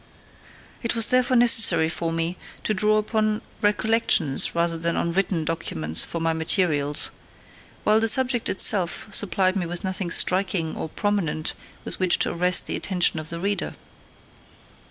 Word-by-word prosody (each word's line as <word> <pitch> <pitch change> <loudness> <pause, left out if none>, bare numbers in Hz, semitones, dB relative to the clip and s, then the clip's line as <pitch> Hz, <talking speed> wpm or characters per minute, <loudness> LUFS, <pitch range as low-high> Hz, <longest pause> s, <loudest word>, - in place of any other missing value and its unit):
It 230 -1 -2
was 230 -1 +3
therefore 255 0 +2
necessary 225 -9 +6
for 165 0 -3
me 165 +2 -2 0.3
to 215 - 0
draw 215 +1 +2
upon 215 0 -1 0.2
recollections 210 -9 +2
rather 170 0 +1
than 170 +1 -1
on 170 - -1
written 180 -3 -1
documents 80 - -1
for 170 - -5
my 165 0 0
materials; 160 -3 0 0.7
while 215 +1 +3
the 225 - +1
subject 250 0 +1
itself 190 0 +1
supplied 190 -1 +1
me 180 -3 -2
with 175 0 -5
nothing 185 -1 -3
striking 180 -2 0
or 160 - -5
prominent 185 -6 -2 0.3
with - - -4
which 185 -2 +2
to - - -1
arrest 180 +1 +1
the - - -3
attention 180 -4 0
of 155 0 -7
the 170 - -5
reader. 200 +2 -3
185 Hz, 155 wpm, -23 LUFS, 165-215 Hz, 0.7 s, necessary